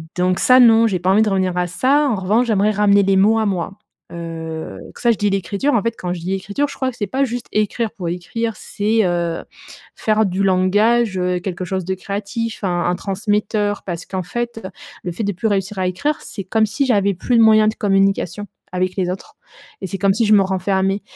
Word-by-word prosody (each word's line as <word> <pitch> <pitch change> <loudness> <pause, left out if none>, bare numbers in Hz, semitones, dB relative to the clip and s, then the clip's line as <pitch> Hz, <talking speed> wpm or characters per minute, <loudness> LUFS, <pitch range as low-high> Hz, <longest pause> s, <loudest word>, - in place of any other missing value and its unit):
Donc 180 0 +1
ça, 255 0 +6
non, 230 -1 +6
j'ai 185 -4 -1
pas 180 +2 -1
envie 210 +3 +4
de 220 - +2
revenir 185 -2 0
à 180 - +1
ça. 275 - +2
En 230 - +1
revanche, 210 +6 +1
j'aimerais 210 -1 +2
ramener 200 -1 +4
les 195 0 +2
mots 210 +4 +4
à 220 - +1
moi. 195 -1 -2 0.4
Heu, 165 -1 -6
que - - -13
ça, 240 -1 +4
je 225 - 0
dis 205 - +1
l'écriture, 195 +8 -1
en 225 - +3
fait, 230 - 0
quand 180 -1 -3
je 180 - -6
dis 180 +3 -4
«l'écriture», 200 +9 -1
je - - -9
crois 260 - -1
que 245 - -17
c'est 205 - -2
pas 265 +7 0
juste 245 -2 -3
écrire 215 +1 -1
pour 175 -3 -5
écrire, 225 +6 -3
c'est, 215 +1 0
heu, 170 -2 -1 0.5
faire 215 0 +1
du 190 +1 -1
langage, 200 +3 +2
heu, 180 0 0
quelque 180 0 -5
chose 185 -1 -3
de 190 0 -2
créatif, 205 +4 -4
un 175 -2 0
un 175 0 +1
transmetteur, 205 +1 -1
parce 170 -3 -5
qu'en 185 -1 -4
fait, 235 +3 -5 0.4
le 175 - -3
fait 195 +6 -4
de 205 - 0
plus 195 +5 -2
réussir 195 0 -1
à 185 - +1
écrire, 290 +12 -1
c'est 195 - -7
comme 220 +4 +1
si 225 +6 -1
j'avais 200 -5 +2
plus 235 +6 0
de - - +6
moyens 215 -1 +5
de 215 - -4
communication 195 -1 0 0.3
avec 185 0 -1
les 185 -2 -1
autres 185 - -8 0.5
et 190 - -3
c'est 195 +1 -5
comme 195 0 +3
si 230 +1 +2
je 215 - +4
me 205 - +6
renfermais. 190 +1 0
200 Hz, 230 wpm, -19 LUFS, 185-220 Hz, 0.5 s, ça